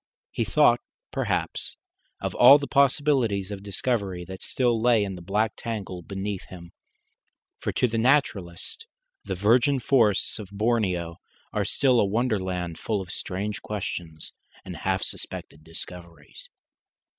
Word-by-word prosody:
He -, -, -1 dB
thought, -, -, +4 dB, 0.3 s
perhaps, -, -, -1 dB, 0.4 s
of -, -, -3 dB
all 130 Hz, +4 st, +9 dB
the 145 Hz, -, -4 dB
possibilities 135 Hz, -8 st, +2 dB
of 100 Hz, -1 st, -5 dB
discovery 100 Hz, -3 st, -2 dB
that 95 Hz, 0 st, -9 dB
still 120 Hz, -3 st, +1 dB
lay 115 Hz, -3 st, +4 dB
in 100 Hz, -1 st, -3 dB
the 90 Hz, -, -8 dB
black 105 Hz, +5 st, 0 dB
tangle 100 Hz, -6 st, -5 dB
beneath 95 Hz, +2 st, -4 dB
him; 85 Hz, -2 st, -11 dB, 0.9 s
for -, -, -2 dB
to 125 Hz, -, +2 dB
the 115 Hz, -1 st, -1 dB
naturalist 120 Hz, -, 0 dB, 0.4 s
the 95 Hz, -, -3 dB
virgin 120 Hz, +8 st, +3 dB
forests 115 Hz, -7 st, +2 dB
of 100 Hz, -3 st, -8 dB
Borneo 100 Hz, -6 st, 0 dB, 0.4 s
are -, -, 0 dB
still 130 Hz, -3 st, +3 dB
a -, -, +4 dB
wonderland 95 Hz, -6 st, -1 dB
full 110 Hz, -2 st, -1 dB
of 90 Hz, -2 st, -6 dB
strange 100 Hz, +4 st, -4 dB
questions 85 Hz, -6 st, -5 dB, 0.3 s
and -, -, -7 dB
half -, -, -1 dB
suspected 75 Hz, -, -5 dB
discoveries. 85 Hz, +1 st, -9 dB
100 Hz, 135 wpm, -26 LUFS, 90-120 Hz, 0.9 s, all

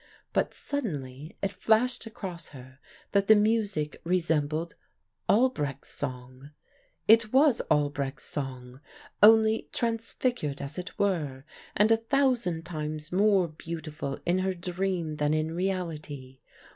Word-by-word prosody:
But -, -, +1 dB
suddenly 155 Hz, -, -5 dB
it 195 Hz, 0 st, 0 dB
flashed 225 Hz, +5 st, +1 dB
across 185 Hz, -6 st, -7 dB
her 130 Hz, -1 st, -13 dB, 0.3 s
that 200 Hz, -1 st, +2 dB
the 220 Hz, -, +8 dB
music 210 Hz, -8 st, 0 dB
resembled 165 Hz, -2 st, 0 dB, 0.6 s
Albrecht's 150 Hz, -, +1 dB
song; 130 Hz, 0 st, -6 dB, 0.6 s
it 225 Hz, 0 st, +6 dB
was 275 Hz, -1 st, +4 dB
Albrecht's 145 Hz, -2 st, 0 dB
song, 130 Hz, -2 st, -6 dB, 0.4 s
only 220 Hz, +1 st, +6 dB
transfigured 230 Hz, -, -2 dB
as 140 Hz, +4 st, -5 dB
it 180 Hz, -, -8 dB
were, 150 Hz, -9 st, -1 dB, 0.3 s
and 210 Hz, +2 st, +4 dB
a 225 Hz, -, +6 dB
thousand 235 Hz, -, +1 dB
times 155 Hz, -2 st, -5 dB
more 195 Hz, -1 st, +4 dB
beautiful 155 Hz, -3 st, -6 dB
in 180 Hz, +2 st, +2 dB
her 190 Hz, 0 st, 0 dB
dream 175 Hz, -3 st, -2 dB
than 150 Hz, +1 st, +1 dB
in 155 Hz, +1 st, -1 dB
reality. 155 Hz, -8 st, -4 dB
170 Hz, 120 wpm, -28 LUFS, 145-215 Hz, 0.6 s, the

